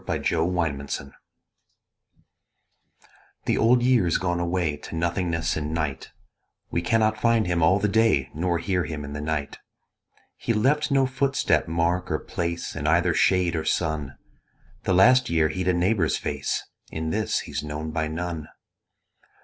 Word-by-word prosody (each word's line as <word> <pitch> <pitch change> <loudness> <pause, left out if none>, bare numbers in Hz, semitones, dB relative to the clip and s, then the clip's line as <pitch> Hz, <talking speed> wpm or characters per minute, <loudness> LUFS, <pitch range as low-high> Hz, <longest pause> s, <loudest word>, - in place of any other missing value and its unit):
The - - -1
Old 85 +2 0
Year 70 -4 -1 2.6
The - - +1
Old 120 +2 +4
Year's 120 -10 +3
gone 90 -2 -1
away 85 -3 0
To 80 - -9
nothingness 85 -1 -1
and 75 +1 -3
night: 75 -5 -3 0.6
We 85 - 0
cannot 110 +3 +1
find 115 -2 +3
him 85 -1 0
all 95 +5 +5
the 105 +1 +1
day 105 - +2
Nor 85 +2 0
hear 90 0 -1
him 75 -2 -5
in 70 - -7
the 75 - -4
night: 75 -2 -3 0.8
He 115 - -1
left 150 +8 +2
no 135 -1 +3
footstep, 135 +1 +1
mark 85 +2 0
or - - +1
place 85 0 -4
In 75 - -3
either 85 +2 +3
shade 90 -1 +2
or 80 - -1
sun: 80 -6 -1 0.7
The - - +2
last 125 +6 +5
year 80 -2 +2
he'd 90 +4 -3
a 90 - +4
neighbour's 90 -2 +1
face, - - -3 0.3
In 80 0 -3
this 110 +1 0
he's - - -5
known 75 +1 -5
by 80 -1 -1
none. 80 -1 -4
85 Hz, 155 wpm, -25 LUFS, 80-100 Hz, 2.6 s, all